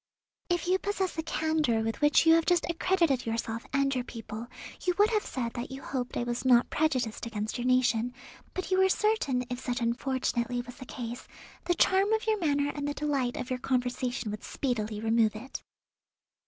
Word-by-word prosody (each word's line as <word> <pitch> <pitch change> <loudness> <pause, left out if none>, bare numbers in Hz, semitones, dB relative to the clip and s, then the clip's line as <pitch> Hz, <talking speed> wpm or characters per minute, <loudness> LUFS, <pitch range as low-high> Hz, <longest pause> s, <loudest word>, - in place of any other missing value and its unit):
"If 350 -1 +1
you 370 +1 +3
possess 390 -2 -1
the 320 - -1
candour 315 -7 +1
with 225 +4 -3
which 295 +2 +5
you 325 - +7
have 330 0 +3
just 350 -2 +3
accredited 335 -7 +1
yourself 225 0 -3
and 275 0 +2
your 250 -2 -1
people, 230 -1 -7 0.4
you 360 -1 +1
would 415 +2 +5
have 430 -2 +2
said 235 -3 -3
that 240 +1 -5
you 265 0 -8
hoped 250 -2 -3
I - - 0
was 240 0 -2
not 250 -2 +4
prejudiced 255 -8 0
against 215 +1 -3
your 245 - -1
nation, 245 -1 +2 0.4
but 370 0 -4
you 375 - +4
were 380 0 +5
certain, 375 - +1
if 245 - -2
such 245 0 -2
unfortunately 245 0 -1
was 245 0 -11
the 255 -3 -10
case, 240 -1 -6 0.4
the 350 0 +2
charm 385 +4 +3
of 440 +1 0
your 435 -1 +1
manner 285 -4 +1
and 290 -1 -3
the 290 - -2
delight 275 -5 -1
of 255 - -5
your 255 - -1
conversation 245 -3 -1
would 210 - -6
speedily 220 -5 -2
remove 220 -1 +2
it." 250 +5 -7
255 Hz, 195 wpm, -29 LUFS, 240-320 Hz, 0.4 s, you